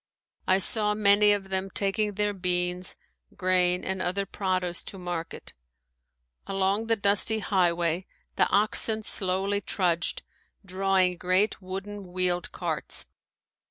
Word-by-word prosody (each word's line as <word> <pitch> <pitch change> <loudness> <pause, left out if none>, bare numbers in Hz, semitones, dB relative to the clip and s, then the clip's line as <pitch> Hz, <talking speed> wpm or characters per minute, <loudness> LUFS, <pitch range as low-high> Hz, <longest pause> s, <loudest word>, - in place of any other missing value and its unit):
I 185 - +4
saw 210 +2 +4
many 205 0 +5
of 200 -2 -1
them 190 0 -2
taking 205 +2 -1
their 210 +1 0
beans, 180 -1 0 0.4
grain, 180 -1 +2
and 190 0 -3
other 195 +3 -1
produce 185 -2 -2
to 195 - -8
market. 175 -2 -6 0.9
Along 195 +3 0
the 225 - +2
dusty 205 +1 +2
highway 175 -3 0 0.3
the - - +2
oxen 215 +2 +2
slowly 195 +1 +1
trudged, 175 -5 -1 0.4
drawing 190 -1 +1
great 185 +5 +1
wooden 195 0 -7
wheeled 180 -1 -1
carts. - - -2
190 Hz, 120 wpm, -26 LUFS, 180-205 Hz, 0.9 s, many